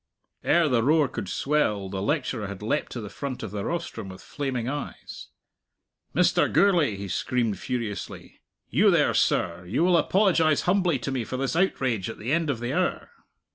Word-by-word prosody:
Ere 170 -2 +3
the 125 -5 +2
roar 150 +4 +3
could 130 - -6
swell, 120 -10 0
the 95 0 -4
lecturer 125 -3 -1
had 100 0 -8
leapt 145 +8 -1
to 120 - -5
the 105 - -6
front 130 +4 -6
of 110 - -5
the 100 -1 -4
rostrum 165 - -4
with 95 - -10
flaming 130 -5 -3
eyes. 145 +2 -6 0.9
"Mr. - - +3
Gourlay," 175 - +3
he 100 0 -6
screamed 115 +3 -1
furiously 115 -5 -5 0.3
"you - - +4
there, - - +3
sir; 85 +1 +1
you 120 - +1
will 180 -1 +4
apologize 170 -6 +3
humbly 180 -4 +2
to 130 +2 -4
me 130 -3 -1
for 130 - -5
this 135 +3 -1
outrage 130 - 0
at - - -7
the 115 +5 -4
end 165 -2 +1
of 130 -5 -1
the 120 +1 -3
hour." - - -1
130 Hz, 180 wpm, -26 LUFS, 105-155 Hz, 0.9 s, you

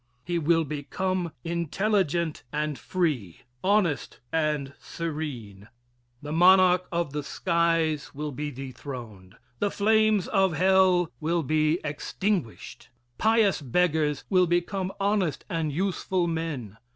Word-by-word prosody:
He 175 0 -1
will 165 +1 +3
become 170 +5 -2
intelligent 170 -1 0
and 150 -1 -2
free, 145 - -2 0.2
honest 185 -7 +1
and 150 -4 0
serene. 135 -12 -6 0.6
The 150 - -5
monarch 180 +2 +5
of 170 -4 -1
the 150 - -2
skies 165 0 0
will 150 +1 -5
be 145 +2 -4
dethroned 125 -7 -8 0.2
the 205 - +1
flames 215 -1 +2
of 195 -4 +2
hell 185 0 +3
will 165 +2 0
be 155 +3 +2
extinguished. 155 - -3 0.3
Pious 220 -5 +3
beggars 150 0 +1
will 185 -2 +3
become 180 +2 -1
honest 200 -5 0
and 165 -3 -1
useful 185 +2 -1
men. 155 - -4
165 Hz, 115 wpm, -26 LUFS, 150-185 Hz, 0.6 s, monarch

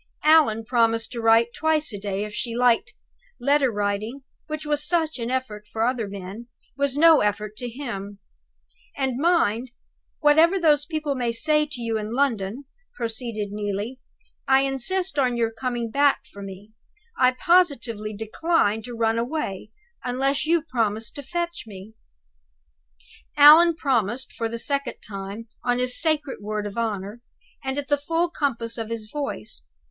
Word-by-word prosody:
Allan 300 -8 +4
promised 230 -1 +1
to 235 - -4
write 225 +1 +4
twice 310 -5 +1
a 205 - -5
day, 200 0 -3
if 210 0 -7
she 230 +1 -3
liked 245 -1 +2 0.4
letter 280 +1 +3
writing, 210 +5 -2 0.3
which 310 0 -5
was 295 -1 0
such 320 -3 0
an 235 0 -3
effort 235 -5 -3
to 220 - -7
other 230 -1 +1
men, 200 +4 -8 0.3
was 280 0 0
no 325 0 +7
effort 210 0 -1
to 245 - -4
him! 225 -6 -6 0.8
"And 265 -2 -1
mind, 260 -8 +2 0.5
whatever 320 +5 +5
those 295 -3 +3
people 310 -3 -2
may 245 -3 -1
say 300 +5 +2
to 270 -5 -6
you 225 -1 -1
in 215 +2 -5
London," 240 -3 0 0.3
proceeded 225 -3 -4
Neelie, 205 +4 -4 0.5
"I 270 0 +5
insist 285 +7 0
on 250 -3 +1
your 230 -1 +1
coming 235 0 -3
back 285 +2 +2
for 200 - -12
me. 195 +2 -10 0.4
I 255 0 +4
positively 255 - +2
decline 220 0 0
to 245 -1 -7
run 225 0 +1
away, 235 -6 -3 0.3
unless 270 +4 0
you 335 -1 +3
promise 225 -6 -1
to 285 - -8
fetch 345 +3 -4
me." 200 +1 -11 1.4
Allan 315 +4 +9
promised 255 -3 -1
for 230 -2 -3
the 230 - -4
second 280 +2 -2
time, 200 +2 -7 0.2
on 245 0 +1
his 250 0 +1
sacred 305 -3 0
word 210 0 -3
of 205 - -6
honor, 215 -1 -3 0.4
and 265 +1 -3
at 285 -1 -3
the 290 - +2
full 330 +4 -1
compass 235 -7 -2
of 225 -1 -4
his 225 -2 -5
voice. 275 - -5
245 Hz, 155 wpm, -24 LUFS, 220-290 Hz, 1.4 s, Allan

